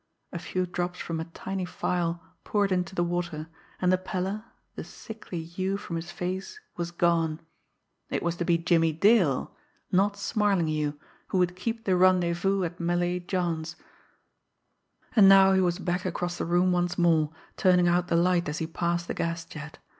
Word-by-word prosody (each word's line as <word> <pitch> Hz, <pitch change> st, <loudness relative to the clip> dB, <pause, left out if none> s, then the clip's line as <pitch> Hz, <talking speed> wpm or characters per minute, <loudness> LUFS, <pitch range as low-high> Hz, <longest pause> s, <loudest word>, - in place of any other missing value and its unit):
A -, -, -3 dB
few 185 Hz, 0 st, -2 dB
drops 180 Hz, 0 st, -3 dB
from 165 Hz, -1 st, -3 dB
a 160 Hz, -, -3 dB
tiny 190 Hz, +3 st, -5 dB
phial 175 Hz, -1 st, -2 dB, 0.2 s
poured 205 Hz, -2 st, +1 dB
into 180 Hz, 0 st, -1 dB
the 175 Hz, -, +2 dB
water, 170 Hz, -2 st, -3 dB, 0.3 s
and 180 Hz, 0 st, +2 dB
the 185 Hz, -, +2 dB
pallor, 190 Hz, +3 st, -3 dB, 0.3 s
the -, -, -6 dB
sickly 200 Hz, -6 st, -8 dB
hue 185 Hz, +4 st, -2 dB
from 175 Hz, -4 st, -6 dB
his 165 Hz, +1 st, -5 dB
face 185 Hz, -, -4 dB, 0.2 s
was 170 Hz, -1 st, -3 dB
gone. 170 Hz, -2 st, +1 dB, 0.7 s
It -, -, -2 dB
was 170 Hz, 0 st, 0 dB
to 175 Hz, -, -1 dB
be 170 Hz, -1 st, +3 dB
Jimmie 165 Hz, -1 st, +2 dB
Dale 180 Hz, -, +3 dB, 0.4 s
not 200 Hz, +2 st, +2 dB
Smarlinghue 165 Hz, -9 st, 0 dB, 0.3 s
who -, -, -1 dB
would 180 Hz, 0 st, +2 dB
keep 225 Hz, +4 st, -4 dB
the 185 Hz, -, +3 dB
rendezvous 185 Hz, +1 st, +3 dB
at 175 Hz, +1 st, -4 dB
Malay 175 Hz, +1 st, 0 dB
John's! 175 Hz, -3 st, -2 dB, 1.4 s
And 200 Hz, -4 st, +8 dB
now 195 Hz, 0 st, +7 dB
he 190 Hz, -, +4 dB
was 175 Hz, -1 st, +1 dB
back 180 Hz, 0 st, -2 dB
across 175 Hz, -1 st, -3 dB
the -, -, -1 dB
room 175 Hz, +2 st, +3 dB
once 175 Hz, 0 st, 0 dB
more, 160 Hz, -4 st, +3 dB, 0.2 s
turning 180 Hz, -1 st, +4 dB
out 175 Hz, 0 st, +2 dB
the 170 Hz, -, +1 dB
light 175 Hz, -1 st, +2 dB
as 150 Hz, -, -3 dB
he 160 Hz, -, -2 dB
passed 170 Hz, +1 st, -2 dB
the -, -, -2 dB
gas 170 Hz, 0 st, -2 dB
jet. 155 Hz, 0 st, -9 dB
175 Hz, 175 wpm, -27 LUFS, 170-185 Hz, 1.4 s, And